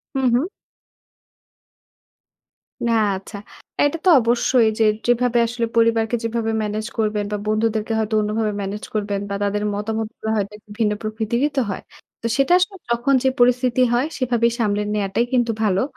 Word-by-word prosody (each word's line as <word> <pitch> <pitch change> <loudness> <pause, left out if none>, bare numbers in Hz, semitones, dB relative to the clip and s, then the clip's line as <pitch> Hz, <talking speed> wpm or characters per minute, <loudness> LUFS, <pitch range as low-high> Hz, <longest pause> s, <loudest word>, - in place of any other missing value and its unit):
হু, 270 - +1
হু। 245 - +4 2.5
না, - - +2 0.2
আচ্ছা। 195 +2 -9 0.5
এটা 290 +3 +1
তো - - +6
অবশ্যই 235 0 +3
যে, - - +4 0.2
যেভাবে 245 0 +2
আসলে 235 0 -2
পরিবারকে 230 0 +3
যেভাবে 230 0 -1
ম্যানেজ 215 0 -3
করবেন 210 -2 0
বা 210 - -1
বন্ধুদেরকে 220 0 0
হয়তো 220 0 -2
অন্যভাবে 215 0 -1
ম্যানেজ 200 +2 -5
করবেন 205 -2 -1
বা 200 - -2
তাদের 205 +1 -1
মতামতগুলা 220 +1 -4
হয়তো 200 0 -2
একটু 210 0 -27
ভিন্ন 215 -2 +2
প্রকৃতিরই 220 +5 -1
তো - - +4
হয়। - - -5 0.4
তো - - -8
সেটা 275 +5 +3
আসলে 375 +2 -1
যখন 240 +4 +1
যে 265 - +4
পরিস্থিতি 250 +1 +3
হয়, 245 +4 +2
সেভাবেই 240 -3 +1
সামলে 210 -2 +1
নেয়াটাই 210 +3 0
কিন্তু 240 -2 +2
ভালো। 195 -3 +2
225 Hz, 155 wpm, -21 LUFS, 210-240 Hz, 2.5 s, তো